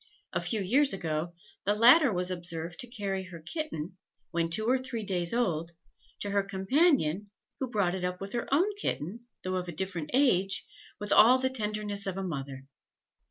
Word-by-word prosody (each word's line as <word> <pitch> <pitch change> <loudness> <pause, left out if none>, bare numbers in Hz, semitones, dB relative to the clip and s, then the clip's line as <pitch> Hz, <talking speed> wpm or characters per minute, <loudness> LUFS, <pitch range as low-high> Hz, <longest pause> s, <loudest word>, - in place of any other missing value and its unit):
A - - 0
few 220 -4 -1
years 265 +9 +3
ago, 165 -2 -3 0.3
the 205 +2 +2
latter 250 +5 +7
was 180 -1 0
observed 175 -1 -5
to 245 - -3
carry 200 -5 -3
her 180 -2 -10
kitten, 180 - -5 0.3
when 165 -1 0
two 215 +6 -1
or 255 +2 +3
three 240 -3 -5
days 175 -4 +1
old, 170 -8 0 0.5
to 205 - -2
her 200 0 +3
companion, 195 - +1 0.3
who 265 - -2
brought 200 -6 +1
it 190 -1 -4
up 180 0 -2
with 195 +1 -7
her 240 +1 -3
own 365 +9 +3
kitten, 235 - -4 0.2
though 185 0 -1
of 180 -1 -3
a - - -4
different 180 -3 -3
age, 195 -8 +2 0.3
with 205 - 0
all 245 +4 +8
the 260 0 0
tenderness 210 -4 0
of 190 -1 -3
a 195 - -2
mother. 135 -6 -5
195 Hz, 185 wpm, -29 LUFS, 175-235 Hz, 0.5 s, all